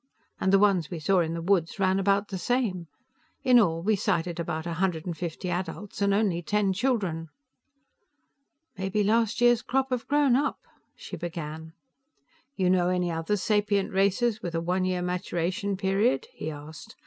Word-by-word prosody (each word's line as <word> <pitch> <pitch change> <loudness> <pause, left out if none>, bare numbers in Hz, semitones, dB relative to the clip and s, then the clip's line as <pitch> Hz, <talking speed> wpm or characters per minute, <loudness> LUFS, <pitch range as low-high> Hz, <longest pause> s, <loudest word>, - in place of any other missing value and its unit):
And 190 - +1
the 195 - +6
ones 195 -5 +3
we 175 - -5
saw 185 +4 +2
in 165 -1 0
the 165 - -4
woods 175 -3 +1
ran 190 -1 +2
about 200 +1 +1
the 190 - -4
same. 205 -8 -1 0.6
In 250 -2 +6
all, 165 -6 +1
we 215 +2 +3
sighted 175 -4 -1
about 160 -1 -3
a 170 - -3
hundred 175 -4 0
and 175 -2 -3
fifty 170 +2 -5
adults 185 +4 -5
and 200 0 +3
only 195 -4 +1
ten 200 +2 +1
children." 190 -8 -1 1.5
"Maybe 195 +2 0
last 225 +2 +1
year's 240 -1 +5
crop 265 +1 -1
have 250 -2 -2
grown 285 -3 +3
up," 280 - 0 0.4
she - - -8
began. 160 -2 -6 0.8
"You 185 -2 +1
know 180 -1 +3
any 180 -1 0
other 165 +5 -1
sapient 205 -1 +1
races 205 +4 +1
with 170 -2 -4
a - - +1
one 180 +2 0
year 180 -1 -1
maturation 180 +3 -2
period?" 200 - +1
he - - -5
asked. 150 0 -10
190 Hz, 170 wpm, -27 LUFS, 170-210 Hz, 1.5 s, the